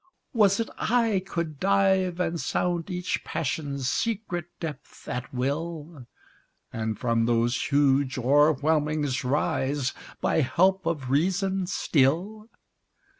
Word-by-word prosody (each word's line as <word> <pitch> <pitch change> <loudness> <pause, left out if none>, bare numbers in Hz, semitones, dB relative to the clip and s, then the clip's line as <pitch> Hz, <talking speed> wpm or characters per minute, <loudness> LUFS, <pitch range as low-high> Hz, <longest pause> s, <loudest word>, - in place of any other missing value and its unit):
Was't 215 -1 +3
I 225 -4 +2
could 160 -6 -4
dive, 190 -2 +2
and 170 -2 -1
sound 175 0 -1
each 180 -1 -2
passion's 140 -2 -3
secret 195 - -2
depth 155 -5 -8
at 125 +1 -4
will? 145 +1 -4 0.7
And 110 -1 -2
from 115 0 +1
those 120 +1 +1
huge 140 -2 +2
o'erwhelmings 145 +1 +2
rise, 135 0 0 0.3
by - - +1
help 185 +8 +2
of 140 -6 -2
reason 190 +5 +1
still? 180 - 0
155 Hz, 105 wpm, -26 LUFS, 135-185 Hz, 0.7 s, Was't